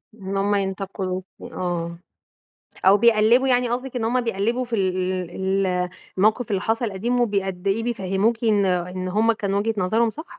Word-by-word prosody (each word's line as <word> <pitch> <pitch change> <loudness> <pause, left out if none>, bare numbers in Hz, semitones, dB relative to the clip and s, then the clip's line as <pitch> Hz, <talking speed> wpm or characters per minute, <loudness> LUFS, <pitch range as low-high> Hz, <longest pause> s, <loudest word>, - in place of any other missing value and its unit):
إن 195 -2 -5
هُم 205 +1 +1
ينتقِدوكِ، 190 -1 -3 0.2
آه، 170 -2 -4 0.9
أو 195 +2 +7
بيقلِّبوا، 235 +4 +4
يعني 245 -1 +2
قصدِك 255 +1 -3
إن 235 - -1
هُم 245 +2 +1
بيقلِّبوا 230 +3 -1
في 235 -1 -2
ال 185 -2 0 0.3
ال 190 -1 0 0.3
الموقف 215 +4 +2
اللي 195 -1 0
حصل 225 0 -1
قديم، 240 +6 -1
وبي 200 -4 +1
قد 190 0 -5
إيه 220 +4 +1
بيفهَّموكِ 225 +1 0
إن 210 -3 +3
إن 180 0 -1
هُم 220 +5 +2
كانوا 200 -2 -1
وجهة 225 +2 0
نظرهم 220 +5 +2
صح؟ 315 +9 -8
200 Hz, 170 wpm, -23 LUFS, 190-230 Hz, 0.9 s, أو